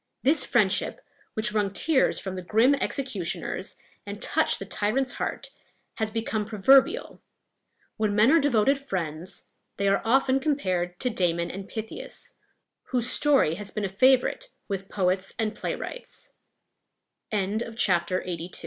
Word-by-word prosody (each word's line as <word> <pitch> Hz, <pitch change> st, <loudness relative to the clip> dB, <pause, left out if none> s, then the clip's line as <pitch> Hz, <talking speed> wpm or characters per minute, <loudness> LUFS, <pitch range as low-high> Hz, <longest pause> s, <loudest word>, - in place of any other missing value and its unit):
This 290 Hz, +1 st, +4 dB
friendship, 205 Hz, -5 st, +1 dB, 0.4 s
which 220 Hz, 0 st, +3 dB
wrung 205 Hz, -2 st, +1 dB
tears 280 Hz, +6 st, +2 dB
from 190 Hz, -, -5 dB
the 185 Hz, -, -5 dB
grim 225 Hz, +9 st, +3 dB
executioners, 260 Hz, -9 st, -2 dB, 0.3 s
and -, -, -7 dB
touched -, -, +1 dB
the -, -, -7 dB
tyrant's 240 Hz, +5 st, 0 dB
heart, -, -, -4 dB, 0.5 s
has 220 Hz, -1 st, 0 dB
become 220 Hz, -1 st, -2 dB
proverbial. 225 Hz, +6 st, +3 dB, 0.8 s
When 215 Hz, -2 st, 0 dB
men 215 Hz, +5 st, +5 dB
are 330 Hz, -, +6 dB
devoted 275 Hz, -1 st, +2 dB
friends, 180 Hz, -, -4 dB, 0.3 s
they 200 Hz, -, 0 dB
are 195 Hz, 0 st, +3 dB
often 265 Hz, +3 st, +3 dB
compared 185 Hz, -, -1 dB
to 250 Hz, -, 0 dB
Damon 170 Hz, -5 st, 0 dB
and 195 Hz, +1 st, -7 dB
Pythias, 220 Hz, 0 st, -7 dB, 0.5 s
whose 250 Hz, -1 st, 0 dB
story 280 Hz, -, +3 dB
has 205 Hz, 0 st, -5 dB
been 210 Hz, -1 st, -3 dB
a -, -, -2 dB
favorite 260 Hz, -, +3 dB, 0.2 s
with 195 Hz, -1 st, -4 dB
poets 185 Hz, 0 st, 0 dB
and 220 Hz, -1 st, -1 dB
playwrights. -, -, -6 dB, 1.0 s
LXXXIII. 190 Hz, -4 st, -1 dB
215 Hz, 130 wpm, -26 LUFS, 190-255 Hz, 1.0 s, are